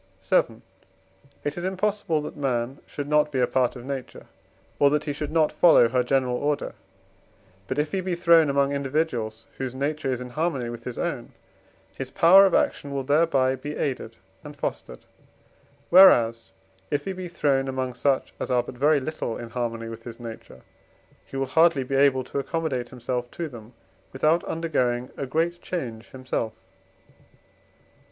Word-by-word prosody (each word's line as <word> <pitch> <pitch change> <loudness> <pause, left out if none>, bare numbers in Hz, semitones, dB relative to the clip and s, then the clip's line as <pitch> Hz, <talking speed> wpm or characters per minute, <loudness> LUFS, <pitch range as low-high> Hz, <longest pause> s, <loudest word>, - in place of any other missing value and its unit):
VII. - - +1 0.8
It 145 +3 -3
is - - -6
impossible, 190 -4 -1
that - - -7
man 130 -2 -2
should 145 -1 -6
not 150 0 +2
be 135 - -1
a 125 - +4
part 125 0 0
of 120 -1 -9
nature, 135 -2 -6 0.5
or 140 - +6
that 150 +1 0
he 145 - -3
should 145 +1 -5
not 160 -2 +3
follow 160 -9 +6
her 125 +1 +2
general 125 -1 +1
order; 145 +1 -1 0.9
but 130 - -3
if 150 +1 0
he 190 - -1
be 185 -1 -2
thrown 170 -3 +5
among 140 0 +2
individuals 130 -6 -2
whose 130 -1 -4
nature 140 0 -2
is 125 - -2
in 125 -1 -8
harmony 140 -4 -1
with 115 0 -9
his 125 - -5
own, - - -4 0.6
his 135 -1 -5
power 190 +5 +7
of - - +1
action 145 - 0
will 140 -1 -2
thereby 140 -2 +2
be 145 +3 -6
aided 135 -3 -3 0.3
and - - -10
fostered, - - -5 0.9
whereas, 115 -11 +6 0.4
if 145 - -1
he 195 - -3
be 185 -1 -6
thrown 140 -5 0
among 130 -1 -3
such 135 +2 0
as - - -4
are 125 -1 +2
but - - -9
very 150 +1 +4
little 135 -5 -4
in 115 -1 -8
harmony 115 -2 -3
with 115 0 -8
his 115 0 -9
nature, 115 - -10 0.7
he 135 - -7
will 135 - 0
hardly 160 0 +3
be 130 - -6
able 135 -1 +4
to 135 - -4
accommodate 140 -5 -2
himself 125 -1 -4
to 170 +5 -5
them 120 -4 -12 0.4
without 155 +5 +2
undergoing 125 -7 -1
a 140 - -4
great 165 +5 -1
change 120 -10 -5
himself. 130 -4 -3
135 Hz, 170 wpm, -25 LUFS, 125-155 Hz, 0.9 s, power